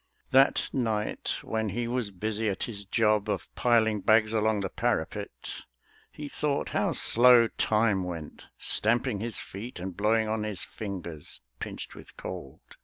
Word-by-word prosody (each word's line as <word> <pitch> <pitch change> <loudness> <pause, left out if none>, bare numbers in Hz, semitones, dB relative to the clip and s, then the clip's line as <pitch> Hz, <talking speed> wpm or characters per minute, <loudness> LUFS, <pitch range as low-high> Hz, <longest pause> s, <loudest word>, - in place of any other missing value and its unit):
That 135 +1 +5
night, 110 -5 -1
when 110 -1 -1
he 120 +4 -2
was 120 -3 -1
busy 110 +3 -2
at 95 - -2
his 100 -4 -4
job 105 0 +2
Of 95 -5 -3
piling 110 -3 +3
bags 110 +1 +4
along 110 -1 +2
the 95 - -2
parapet, - - -3 0.5
He 150 - -7
thought 145 0 -1
how - - 0
slow 120 -1 +6
time 105 -3 +2
went, 85 -4 -7
stamping 120 0 +2
his 115 0 -4
feet, 105 +2 -8
And 90 0 -5
blowing 110 +2 +2
on 110 0 -1
his 105 -4 -2
fingers, 90 -7 -6 0.2
pinched - - -5
with - - -13
cold. 65 - -7
110 Hz, 150 wpm, -28 LUFS, 100-115 Hz, 0.5 s, slow